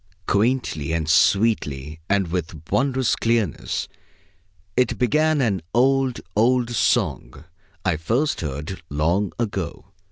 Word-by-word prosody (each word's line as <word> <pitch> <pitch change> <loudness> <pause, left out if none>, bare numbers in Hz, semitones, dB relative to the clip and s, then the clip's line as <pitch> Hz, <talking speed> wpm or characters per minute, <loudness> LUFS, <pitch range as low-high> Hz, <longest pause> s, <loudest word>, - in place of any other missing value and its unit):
Quaintly 100 - 0
and 80 -1 -1
sweetly 80 -6 +2
and 100 -3 +1
with 85 -3 -3
wondrous 130 -2 +2
clearness 115 -7 -1 0.9
it 125 -2 +1
began 150 +5 +2
an 100 -8 +1
old, 135 0 +2
old 120 +2 +2
song 120 - 0 0.4
I 90 -4 +2
first 120 - 0
heard 75 +4 -5
long 85 +7 0
ago. 100 -4 -4
100 Hz, 105 wpm, -23 LUFS, 80-125 Hz, 0.9 s, sweetly